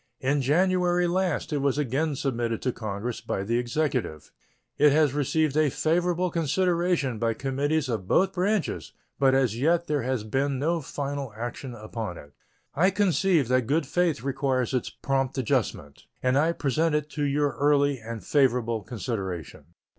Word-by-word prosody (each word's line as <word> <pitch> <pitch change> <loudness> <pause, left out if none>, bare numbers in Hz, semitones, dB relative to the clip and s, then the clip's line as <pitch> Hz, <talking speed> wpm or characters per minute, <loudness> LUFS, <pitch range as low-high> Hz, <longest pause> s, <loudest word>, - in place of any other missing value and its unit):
In 140 +2 +1
January 180 +4 +2
last 175 -3 -1
it 145 - +1
was 140 0 +1
again 145 +2 0
submitted 120 -4 -1
to 125 - +1
Congress 110 +1 -4
by 95 - -3
the 115 +4 0
Executive. 125 - -2 0.5
It 150 0 +6
has 150 -3 +3
received 150 +1 +1
a 155 -1 +3
favorable 175 +4 0
consideration 170 - 0
by 115 0 0
committees 140 +3 -1
of 110 -7 -3
both 190 - +3
branches, 195 +1 -1 0.3
but 135 -1 +4
as 125 -4 +1
yet 170 +5 +2
there 150 -3 0
has 125 -2 -1
been 135 +5 -1
no 165 +5 0
final 140 -2 -4
action 120 +2 -5
upon 110 -4 -6
it. 75 -2 -13 0.4
I 180 +6 +3
conceive 190 - +2
that 130 -2 +2
good 150 +3 +1
faith 165 -3 0
requires 135 -2 0
its 125 - -1
prompt 135 -1 -2
adjustment, 75 - -2 0.2
and 130 0 +2
I 160 +4 +3
present 155 +2 0
it 150 -1 0
to 150 - -3
your 145 0 +1
early 145 -1 +3
and 115 -2 -7
favorable 125 -5 +2
consideration. 95 - -5
140 Hz, 160 wpm, -26 LUFS, 120-160 Hz, 0.5 s, It